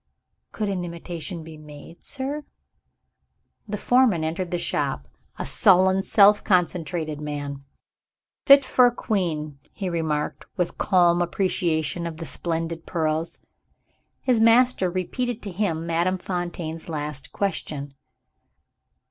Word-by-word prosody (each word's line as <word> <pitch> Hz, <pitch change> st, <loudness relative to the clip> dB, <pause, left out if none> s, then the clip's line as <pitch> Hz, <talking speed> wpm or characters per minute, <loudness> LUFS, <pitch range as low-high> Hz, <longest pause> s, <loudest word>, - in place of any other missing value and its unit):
"Could 215 Hz, -, -3 dB
an 190 Hz, -3 st, -2 dB
imitation 170 Hz, 0 st, -6 dB
be 160 Hz, -1 st, -11 dB
made, 150 Hz, +2 st, -13 dB
sir?" 285 Hz, +2 st, -4 dB, 1.2 s
The 210 Hz, 0 st, -3 dB
foreman 245 Hz, -8 st, +3 dB
entered 170 Hz, +3 st, -2 dB
the 175 Hz, -, -1 dB
shop 140 Hz, -, -2 dB, 0.3 s
a -, -, -4 dB
sullen, 190 Hz, +1 st, +4 dB
self 205 Hz, +1 st, +5 dB
concentrated 165 Hz, -4 st, 0 dB
man. 145 Hz, -2 st, -5 dB, 0.8 s
"Fit 275 Hz, -1 st, +8 dB
for 250 Hz, -1 st, +5 dB
a -, -, +2 dB
queen," 155 Hz, -, -2 dB
he 195 Hz, -3 st, -4 dB
remarked, 155 Hz, -3 st, -2 dB
with 180 Hz, -2 st, -2 dB
calm 175 Hz, -2 st, +4 dB
appreciation 170 Hz, -3 st, 0 dB
of 160 Hz, -1 st, -7 dB
the 165 Hz, -, -6 dB
splendid 165 Hz, -1 st, -3 dB
pearls. 160 Hz, -1 st, -1 dB, 0.8 s
His 250 Hz, -3 st, +3 dB
master 230 Hz, -3 st, +4 dB
repeated 225 Hz, +7 st, -2 dB
to 200 Hz, -, -5 dB
him 170 Hz, -4 st, -1 dB
Madame 170 Hz, +3 st, +1 dB
Fontaine's 175 Hz, -3 st, -5 dB
last 150 Hz, -3 st, -5 dB
question. 150 Hz, -8 st, -3 dB
175 Hz, 120 wpm, -24 LUFS, 160-195 Hz, 1.2 s, Fit